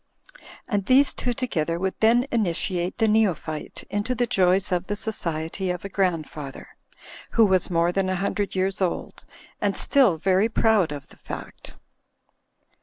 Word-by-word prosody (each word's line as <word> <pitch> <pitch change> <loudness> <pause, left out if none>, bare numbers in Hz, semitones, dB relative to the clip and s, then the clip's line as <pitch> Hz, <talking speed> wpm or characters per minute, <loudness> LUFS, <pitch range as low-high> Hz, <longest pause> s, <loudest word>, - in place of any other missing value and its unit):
*' - - -19
And 205 -4 -1
these 270 +2 +5
two 245 - -2
together 170 - -2
would 190 +2 -1
then 235 +3 +4
initiate 180 -4 -1
the 225 - +2
neophyte 190 -8 0
into 205 +5 -2
the 245 - +1
joys 185 -3 +2
of 180 0 -1
the 205 - -2
society 175 -3 -3
of 180 +1 -3
a - - -4
grandfather, 160 -7 -3 0.6
who 225 - +6
was 190 -3 +2
more 170 0 +2
than 190 +1 0
a 185 - 0
hundred 200 +2 -2
years 190 +1 -1
old, 180 -2 -3 0.4
and - - 0
still 250 - +3
very 190 +6 +2
proud 220 -7 +2
of 145 -1 -7
the - - -18
fact. - - -9
190 Hz, 160 wpm, -24 LUFS, 175-220 Hz, 0.6 s, who